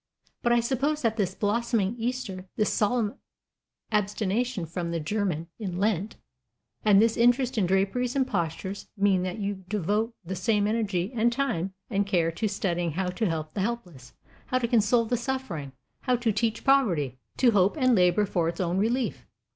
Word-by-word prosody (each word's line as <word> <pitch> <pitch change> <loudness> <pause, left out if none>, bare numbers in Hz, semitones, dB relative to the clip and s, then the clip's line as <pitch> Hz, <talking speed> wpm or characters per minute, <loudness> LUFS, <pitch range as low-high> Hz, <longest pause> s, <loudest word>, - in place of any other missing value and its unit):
But 240 - +1
I 240 0 +4
suppose 275 +5 0
that 225 -2 +2
this 190 -4 -1
blossoming 220 -1 0
Easter, 225 -6 -4
this 215 - +1
solemn 215 0 0 0.7
abstention 210 +1 0
from 170 +1 -4
'the 170 0 -1
German' 175 -2 -1
in 185 -5 -4
Lent, 205 0 0 0.7
and 205 -2 +6
this 225 +1 +4
interest 245 +2 +3
in 205 -6 +2
draperies 200 +7 +1
and 270 -1 +3
postures, 190 -1 -3
mean 195 -2 +3
that 185 +3 -3
you 200 -2 -3
devote 210 +4 0
the 190 +3 -4
same 205 +3 +1
energy 205 -3 0
and 235 +1 +3
time 195 -9 -1
and 200 -2 0
care 170 -4 +2
to 215 +7 -2
studying 175 -5 -1
how 180 +2 -1
to 185 +3 -1
help 155 -1 -3
the 200 - -2
helpless, 180 - -4 0.3
how 255 - +1
to 245 -2 0
console 230 0 +3
the 245 +2 0
suffering, 240 - -4 0.3
how 250 -2 +1
to 235 -2 +1
teach 225 +1 -1
poverty 175 - +2 0.2
to 250 -3 +5
hope 200 +4 +3
and 255 -3 +4
labor 185 +1 +4
for 175 -4 0
its 170 - -6
own 180 0 0
relief. 240 +4 -1
205 Hz, 175 wpm, -27 LUFS, 180-235 Hz, 0.7 s, and